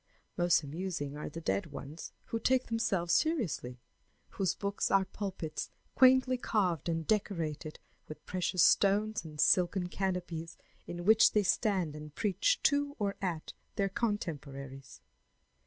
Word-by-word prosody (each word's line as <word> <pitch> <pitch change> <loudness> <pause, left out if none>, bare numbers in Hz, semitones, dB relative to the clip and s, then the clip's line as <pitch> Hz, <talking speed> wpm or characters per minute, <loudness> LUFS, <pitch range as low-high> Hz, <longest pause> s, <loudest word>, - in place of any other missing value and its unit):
Most 175 -2 +3
amusing 155 -1 -4
are 150 - -5
the 165 +2 -8
dead 170 +3 -1
ones 145 +1 -8
who 230 - -3
take 255 +2 +2
themselves 195 -7 0
seriously, 185 - 0 0.5
whose 190 -3 -1
books 200 0 -2
are 195 -1 +3
pulpits 190 -5 -5 0.2
quaintly 260 -1 +5
carved 180 - 0
and 165 -1 -1
decorated 165 -7 -2 0.3
with 155 - -10
precious 185 -1 +1
stones 210 +1 +3
and 155 -2 -10
silken 180 +1 +3
canopies 180 -4 -3 0.3
in 175 0 -6
which 220 +1 +6
they 210 - +3
stand 185 -6 +1
and 150 -1 -9
preach 230 - +1
to 285 -1 +2
or 200 -2 -1
at 170 -5 -3 0.2
their 195 -1 +1
contemporaries. 140 - -4
180 Hz, 135 wpm, -32 LUFS, 160-210 Hz, 0.5 s, which